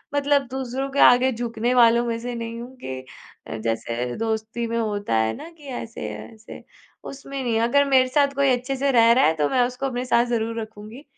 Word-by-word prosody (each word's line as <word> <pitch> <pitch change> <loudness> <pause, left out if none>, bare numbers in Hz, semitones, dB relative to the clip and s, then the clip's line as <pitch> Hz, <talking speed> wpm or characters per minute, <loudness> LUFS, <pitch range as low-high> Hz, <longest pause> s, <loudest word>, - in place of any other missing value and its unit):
मतलब 285 0 +3
दूसरों 265 +1 -3
के 280 - -2
आगे 250 +2 +5
झुकने 235 0 -2
वालों 235 -1 +5
में 230 -1 -2
से 245 +1 -5
नहीं 230 0 -5
हूँ 250 +2 -10
कि 130 0 -5 0.5
अ, 115 - -5
जैसे 115 +2 -3
दोस्ती 225 +1 -2
में 230 0 -2
होता 205 - -2
है 110 0 +1
ना - - -9
कि 300 - -18
ऐसे-ऐसे 230 -3 -8 0.4
उसमें 275 0 -7
नहीं 240 -2 -1
है, - - +2
अगर 280 +5 +3
मेरे 260 -2 +4
साथ 280 +2 +2
कोई 280 0 +2
अच्छे 255 +2 0
से 275 +1 +1
रह 230 -2 +5
रहा 260 - +4
है 160 - +3
तो 150 -2 +1
मैं 255 - +2
उसको 255 +2 -6
अपने 250 -2 -2
साथ 235 -1 +3
ज़रूर 230 -1 -2
रखूँगी, 220 +4 -10
240 Hz, 210 wpm, -23 LUFS, 225-265 Hz, 0.5 s, आगे